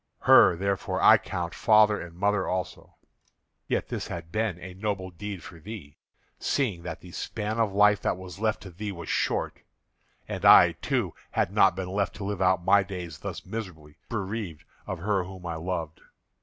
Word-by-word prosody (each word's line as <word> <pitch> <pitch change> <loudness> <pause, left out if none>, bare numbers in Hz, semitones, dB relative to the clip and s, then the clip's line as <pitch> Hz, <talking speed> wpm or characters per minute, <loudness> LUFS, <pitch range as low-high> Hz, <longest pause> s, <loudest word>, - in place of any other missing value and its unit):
Her, 90 - +7
therefore, 100 +2 -2
I - - +7
count 85 -1 -4
father 105 -1 +4
and 85 -1 -9
mother 100 0 +1
also. 90 -1 -4 0.7
Yet - - -1
this - - -4
had 85 -1 -7
been 110 -3 -1
a 90 +1 -9
noble 95 -1 -3
deed 95 0 -7
for 85 - -11
thee, 85 -6 -9 0.4
seeing 110 -12 0
that 85 -2 -7
the 90 - -12
span 110 +4 -4
of 110 -3 +2
life 105 0 +4
that - - 0
was 95 0 -10
left 110 -1 0
to 95 - -10
thee 105 +4 -5
was 85 -4 -8
short. - - 0 0.7
And - - -5
I, - - +8
too, - - -2 0.2
had - - 0
not - - +5
been 95 -1 -4
left 100 +1 -1
to 105 - -7
live 100 -1 -3
out 95 -1 +2
my 100 +2 +6
days 90 -5 -7
thus - - -6
miserably, 80 -9 -7
bereaved 100 -6 -4 0.2
of 95 - -3
her 95 +2 0
whom 95 -1 -10
I 85 -1 -3
loved. 80 -2 -4
95 Hz, 185 wpm, -27 LUFS, 85-105 Hz, 0.7 s, I